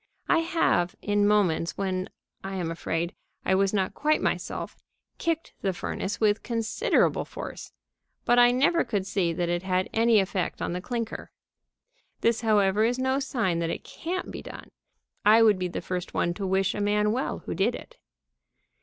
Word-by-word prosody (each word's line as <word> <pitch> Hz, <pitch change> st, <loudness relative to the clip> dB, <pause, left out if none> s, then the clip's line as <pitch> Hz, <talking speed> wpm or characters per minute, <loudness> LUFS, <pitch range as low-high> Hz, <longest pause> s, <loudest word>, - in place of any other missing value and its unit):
I -, -, +4 dB
have, 325 Hz, -, +1 dB
in 205 Hz, 0 st, +2 dB
moments 185 Hz, -6 st, +2 dB
when, 185 Hz, -1 st, -2 dB, 0.3 s
I 195 Hz, 0 st, -5 dB
am 175 Hz, -3 st, -2 dB
afraid, 165 Hz, +1 st, -2 dB, 0.3 s
I -, -, +2 dB
was 195 Hz, 0 st, +3 dB
not 195 Hz, -3 st, 0 dB
quite 305 Hz, +1 st, +1 dB
myself, -, -, -2 dB, 0.4 s
kicked 330 Hz, -1 st, -2 dB
the 195 Hz, -1 st, 0 dB
furnace 190 Hz, +3 st, -4 dB
with 210 Hz, -1 st, +2 dB
considerable 230 Hz, -, +1 dB
force, -, -, -8 dB, 0.5 s
but 240 Hz, +1 st, +4 dB
I 245 Hz, 0 st, +7 dB
never 280 Hz, +7 st, +3 dB
could 200 Hz, -4 st, -2 dB
see 185 Hz, -3 st, 0 dB
that 175 Hz, +1 st, -1 dB
it 175 Hz, 0 st, 0 dB
had 185 Hz, 0 st, -1 dB
any 225 Hz, -1 st, +4 dB
effect 190 Hz, -1 st, -1 dB
on -, -, -2 dB
the 180 Hz, -, -3 dB
clinker. 230 Hz, +1 st, -4 dB, 0.9 s
This, 230 Hz, 0 st, +2 dB
however, 210 Hz, -2 st, +3 dB
is 240 Hz, +2 st, +1 dB
no 260 Hz, +1 st, +1 dB
sign 230 Hz, -11 st, -1 dB
that 165 Hz, -1 st, -1 dB
it -, -, -4 dB
can't 360 Hz, +3 st, -5 dB
be -, -, -7 dB
done. -, -, -10 dB, 0.5 s
I 220 Hz, +2 st, +7 dB
would 210 Hz, -4 st, +5 dB
be 180 Hz, -, -1 dB
the 175 Hz, -, -5 dB
first 180 Hz, -1 st, -4 dB
one 175 Hz, -, +1 dB
to 195 Hz, +1 st, -4 dB
wish 190 Hz, 0 st, +1 dB
a 205 Hz, -, -3 dB
man 210 Hz, +1 st, +2 dB
well 255 Hz, +4 st, -2 dB
who -, -, -3 dB
did -, -, +1 dB
it. -, -, -11 dB
205 Hz, 180 wpm, -27 LUFS, 185-235 Hz, 0.9 s, I